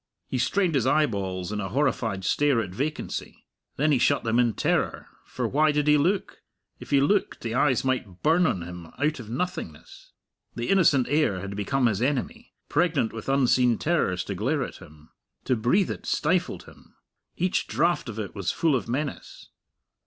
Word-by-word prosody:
He 130 - -2
strained 180 +6 +1
his 130 -3 +1
eyeballs 100 - 0
in 105 - -3
a 95 - -4
horrified 115 -8 -1
stare 145 0 +2
at 100 -5 -3
vacancy. 145 +10 -4 0.3
Then 150 +2 +2
he 135 - +3
shut 140 +3 +2
them 115 +1 +1
in 120 -2 +3
terror, - - -1 0.2
for - - -3
why 155 +2 +3
did 150 0 0
he 150 0 +5
look? 185 +7 0 0.4
If - - -11
he 140 - +4
looked, 195 +9 +1
the 115 -1 -3
eyes 130 -1 +2
might 115 -8 -2
burn 165 +3 +4
on 90 - -1
him 90 -1 -9
out 150 0 0
of 110 -3 -9
nothingness. 145 - -6 0.4
The 120 0 -3
innocent 160 -9 +4
air 145 -11 +1
had 100 +1 -6
become 125 +6 0
his 110 -3 +1
enemy 130 -4 -2 0.2
pregnant 155 -7 +1
with 115 +3 -6
unseen 125 -3 +3
terrors 95 - 0
to 100 - -4
glare 130 - 0
at - - -7
him. 75 -4 -16 0.3
To 130 - +1
breathe 125 - +2
it - - -7
stifled 180 +3 0
him; - - -18 0.4
each 185 +1 0
draught 150 +3 0
of 110 - -7
it 105 -3 -5
was 95 -3 -2
full 160 -4 +1
of 115 - -3
menace. 145 +4 -5
130 Hz, 180 wpm, -26 LUFS, 105-150 Hz, 0.4 s, he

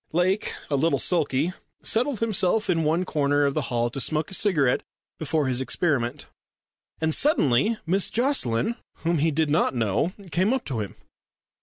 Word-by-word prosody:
Lake, 185 +4 +1 0.2
a - - +2
little 160 +4 +2
sulky, 160 -1 +1 0.3
settled 245 +1 +1
himself 215 -1 +1
in 165 -2 +1
one 165 +4 +1
corner 145 -3 +1
of 140 - +1
the 155 - 0
hall 120 -1 0
to 135 - -3
smoke 155 +5 0
a - - -6
cigarette 160 -11 +2 0.4
before 155 -1 0
his 130 -1 +1
experiment. 130 -1 -1 0.7
And 160 0 0
suddenly 215 - +3
Miss 190 +3 +1
Jocelyn, 235 - 0 0.3
whom 170 -1 +1
he 160 +3 +2
did 155 0 0
not 150 -3 +2
know, 115 - 0 0.2
came 190 +7 +2
up 265 - -2
to 125 -5 -3
him. 105 -2 -5
160 Hz, 165 wpm, -25 LUFS, 135-185 Hz, 0.7 s, suddenly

